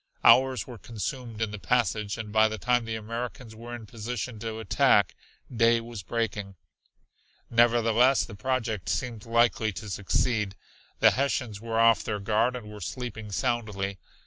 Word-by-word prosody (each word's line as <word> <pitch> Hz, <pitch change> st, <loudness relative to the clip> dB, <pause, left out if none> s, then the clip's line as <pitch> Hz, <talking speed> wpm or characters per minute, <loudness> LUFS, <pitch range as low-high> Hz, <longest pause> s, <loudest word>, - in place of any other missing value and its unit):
Hours 130 Hz, -3 st, +5 dB
were 120 Hz, -3 st, -10 dB
consumed 115 Hz, 0 st, -4 dB
in 110 Hz, -, -2 dB
the 105 Hz, -, -6 dB
passage, 110 Hz, -3 st, 0 dB
and 110 Hz, -2 st, -6 dB
by 110 Hz, +1 st, +5 dB
the 110 Hz, 0 st, -4 dB
time 120 Hz, +1 st, +1 dB
the 115 Hz, 0 st, -3 dB
Americans 115 Hz, +1 st, -6 dB
were 120 Hz, +2 st, -7 dB
in 115 Hz, -2 st, -9 dB
position 115 Hz, +1 st, -5 dB
to 110 Hz, 0 st, -4 dB
attack, 110 Hz, -3 st, +3 dB, 0.4 s
day 115 Hz, 0 st, +4 dB
was 115 Hz, -2 st, -7 dB
breaking. 105 Hz, -1 st, -3 dB, 1.0 s
Nevertheless 120 Hz, +2 st, +4 dB
the 110 Hz, -, -10 dB
project 110 Hz, -2 st, -2 dB
seemed 115 Hz, -4 st, -3 dB
likely 115 Hz, -1 st, +2 dB
to 105 Hz, +1 st, -7 dB
succeed. 105 Hz, +1 st, 0 dB, 0.5 s
The -, -, +7 dB
Hessians 130 Hz, -6 st, -1 dB
were 115 Hz, 0 st, -2 dB
off 115 Hz, 0 st, +5 dB
their 105 Hz, -2 st, -2 dB
guard 110 Hz, +5 st, +1 dB
and 120 Hz, -4 st, -7 dB
were 105 Hz, -1 st, -10 dB
sleeping 110 Hz, 0 st, -6 dB
soundly. 100 Hz, -3 st, -2 dB
115 Hz, 155 wpm, -27 LUFS, 105-120 Hz, 1.0 s, The